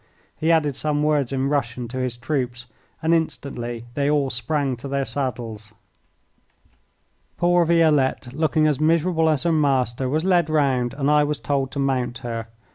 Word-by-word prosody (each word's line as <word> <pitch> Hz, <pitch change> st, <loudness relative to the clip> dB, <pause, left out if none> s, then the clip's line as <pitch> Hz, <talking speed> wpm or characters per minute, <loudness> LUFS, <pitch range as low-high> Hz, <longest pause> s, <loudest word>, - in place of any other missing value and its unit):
He 160 Hz, +2 st, +1 dB
added 150 Hz, -4 st, +2 dB
some 150 Hz, +1 st, -1 dB
words 150 Hz, -4 st, +1 dB
in 135 Hz, 0 st, 0 dB
Russian 125 Hz, -4 st, -1 dB
to 130 Hz, +2 st, -5 dB
his 125 Hz, -2 st, -2 dB
troops, 125 Hz, -2 st, -3 dB, 0.4 s
and 160 Hz, +1 st, +3 dB
instantly 120 Hz, -7 st, -3 dB
they 140 Hz, +1 st, 0 dB
all 145 Hz, -3 st, +1 dB
sprang 135 Hz, +3 st, -1 dB
to 125 Hz, -, -8 dB
their 140 Hz, 0 st, -1 dB
saddles. 115 Hz, -6 st, -5 dB, 1.6 s
Poor 175 Hz, 0 st, +3 dB
Violette, 150 Hz, -6 st, +2 dB
looking 155 Hz, +1 st, +1 dB
as 150 Hz, -3 st, +1 dB
miserable 160 Hz, +1 st, +2 dB
as 150 Hz, -3 st, +1 dB
her 170 Hz, -, +2 dB
master, 135 Hz, -4 st, +1 dB
was 155 Hz, +5 st, 0 dB
led 175 Hz, -4 st, +3 dB
round 135 Hz, -6 st, +1 dB
and 140 Hz, 0 st, +1 dB
I 150 Hz, 0 st, +5 dB
was 145 Hz, -1 st, -2 dB
told 135 Hz, -2 st, -1 dB
to -, -, -6 dB
mount 130 Hz, -3 st, 0 dB
her. 115 Hz, -1 st, -4 dB
140 Hz, 165 wpm, -23 LUFS, 125-155 Hz, 1.6 s, I